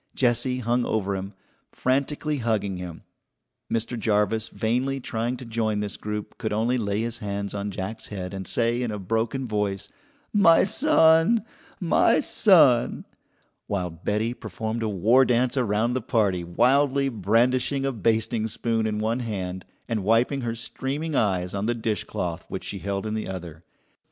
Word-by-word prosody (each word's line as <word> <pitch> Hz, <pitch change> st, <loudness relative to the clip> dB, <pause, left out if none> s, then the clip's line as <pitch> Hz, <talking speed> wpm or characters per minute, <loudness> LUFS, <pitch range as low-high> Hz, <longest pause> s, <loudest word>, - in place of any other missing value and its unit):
Jessie 125 Hz, 0 st, +1 dB
hung 120 Hz, 0 st, 0 dB
over 100 Hz, -4 st, -1 dB
him, 95 Hz, +1 st, -6 dB, 0.4 s
frantically 140 Hz, +3 st, -1 dB
hugging 105 Hz, -5 st, -1 dB
him. 90 Hz, -2 st, -8 dB, 0.7 s
Mr. 115 Hz, +1 st, -1 dB
Jarvis, 110 Hz, +1 st, +1 dB
vainly 125 Hz, +5 st, -1 dB
trying 120 Hz, 0 st, -2 dB
to 125 Hz, -, -9 dB
join 110 Hz, -2 st, -1 dB
this 105 Hz, -1 st, -3 dB
group, 105 Hz, +1 st, -6 dB
could 110 Hz, -3 st, -2 dB
only 115 Hz, +4 st, +1 dB
lay 100 Hz, -1 st, -1 dB
his 120 Hz, +1 st, -3 dB
hands 100 Hz, -1 st, -4 dB
on 100 Hz, 0 st, -3 dB
Jack's 100 Hz, +3 st, -5 dB
head 95 Hz, -2 st, -6 dB
and 95 Hz, -2 st, -5 dB
say 120 Hz, +1 st, +1 dB
in 120 Hz, -, -1 dB
a 105 Hz, -, -3 dB
broken 115 Hz, +6 st, -1 dB
voice: 105 Hz, -2 st, -2 dB, 0.4 s
"My 190 Hz, -6 st, +6 dB
son! 195 Hz, -, +4 dB, 0.3 s
My -, -, +3 dB
son!" 145 Hz, -, +4 dB, 0.6 s
while 90 Hz, -4 st, -2 dB
Betty 105 Hz, +7 st, -1 dB
performed 115 Hz, -1 st, -5 dB
a 110 Hz, -, 0 dB
war 110 Hz, +7 st, +4 dB
dance 125 Hz, +1 st, +2 dB
around 115 Hz, -1 st, +1 dB
the 130 Hz, -, -1 dB
party, 105 Hz, -7 st, +1 dB
wildly 135 Hz, +9 st, +2 dB
brandishing 125 Hz, +5 st, +1 dB
a 135 Hz, -, +1 dB
basting 110 Hz, 0 st, 0 dB
spoon 115 Hz, 0 st, -1 dB
in 105 Hz, -1 st, -2 dB
one 110 Hz, +3 st, 0 dB
hand 95 Hz, -6 st, -4 dB, 0.2 s
and 110 Hz, -4 st, -2 dB
wiping 115 Hz, +6 st, +2 dB
her 115 Hz, -2 st, -2 dB
streaming 140 Hz, +6 st, -4 dB
eyes 90 Hz, -6 st, +1 dB
on 100 Hz, +2 st, -2 dB
the 120 Hz, -, +1 dB
dishcloth 100 Hz, -6 st, -3 dB
which -, -, -5 dB
she 100 Hz, -, -4 dB
held 100 Hz, +1 st, -3 dB
in 110 Hz, -, -2 dB
the 110 Hz, -, -3 dB
other. 85 Hz, -3 st, -7 dB
115 Hz, 160 wpm, -25 LUFS, 100-125 Hz, 0.7 s, My